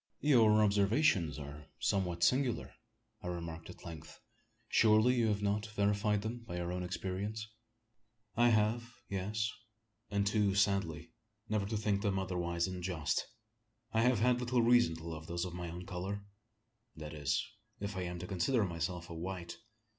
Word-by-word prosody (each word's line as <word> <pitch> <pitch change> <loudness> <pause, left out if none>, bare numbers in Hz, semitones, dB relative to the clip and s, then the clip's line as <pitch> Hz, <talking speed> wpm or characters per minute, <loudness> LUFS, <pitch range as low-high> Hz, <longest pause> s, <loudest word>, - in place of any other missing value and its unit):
"Your 110 -7 +5
observations 100 - +3
are 75 0 -8
somewhat 90 -3 0
singular?" 130 -2 +2 0.5
I - - -6
remarked 85 -2 -5
at - - -12
length. 80 -2 -9 0.5
"Surely 110 +2 +5
you 120 -3 +2
have 105 -1 0
not 105 +2 0
verified 105 0 +1
them 115 +2 -3
by 110 -7 -7
your 85 0 -2
own 90 0 -2
experience?" 95 +4 -3 0.9
"I 120 0 +5
have. 115 +2 +1
Yes 105 +3 -1 0.6
and 100 -1 +1
too 100 -1 +2
sadly, 85 -6 +1 0.4
ever 105 -2 +1
to 110 +1 -1
think 105 -2 +1
them 100 -2 +1
otherwise 85 -2 -1
than 95 -1 -5
just. 85 -4 -1 0.7
I 110 - +3
have 125 0 +4
had 125 +1 +4
little 125 -1 +2
reason 120 -8 +5
to 80 +1 -8
love 80 -1 -6
those 85 +1 -2
of 90 - -6
my 90 -1 -4
own 90 +2 -7
colour 95 +3 -4 0.7
that 75 0 -7
is, 70 -3 0 0.3
if 100 0 -4
I 95 - -2
am 90 -1 -3
to - - -4
consider 100 +7 +1
myself 85 0 -3
a - - -4
white." 85 0 -5
100 Hz, 160 wpm, -34 LUFS, 85-110 Hz, 0.9 s, Your